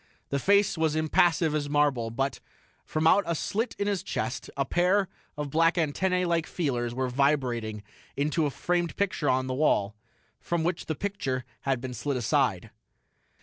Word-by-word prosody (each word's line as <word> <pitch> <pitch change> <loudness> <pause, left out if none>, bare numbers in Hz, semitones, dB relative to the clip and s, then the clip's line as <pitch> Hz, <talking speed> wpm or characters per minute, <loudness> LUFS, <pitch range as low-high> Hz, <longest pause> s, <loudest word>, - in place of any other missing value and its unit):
The 140 - 0
face 200 0 +3
was 160 -1 +1
impassive 155 0 +3
as 145 -1 -1
marble, 145 -6 +2
but, 135 +4 -2 0.4
from 155 0 -2
out 200 +5 +6
a 170 - 0
slit 220 +9 -2
in 200 - -1
his 200 -3 0
chest, 130 -9 -3
a 140 - +1
pair 185 +5 +2 0.3
of 145 -2 -4
black 165 +3 +3
antennae 180 +3 +1
like 170 -2 0
feelers 120 -8 -2
were 130 0 0
vibrating 125 -5 0 0.3
into 150 +2 +1
a - - -1
framed 175 +5 -1
picture 185 -7 0
on 130 0 +2
the 130 - -2
wall, 110 -7 +1 0.4
from 170 -1 -1
which 175 +1 -2
the 155 - -1
picture 135 -10 -3 0.2
had 135 -2 +1
been 130 -1 -5
slid 130 +4 -2
aside. 120 - +1
150 Hz, 170 wpm, -27 LUFS, 130-175 Hz, 0.4 s, out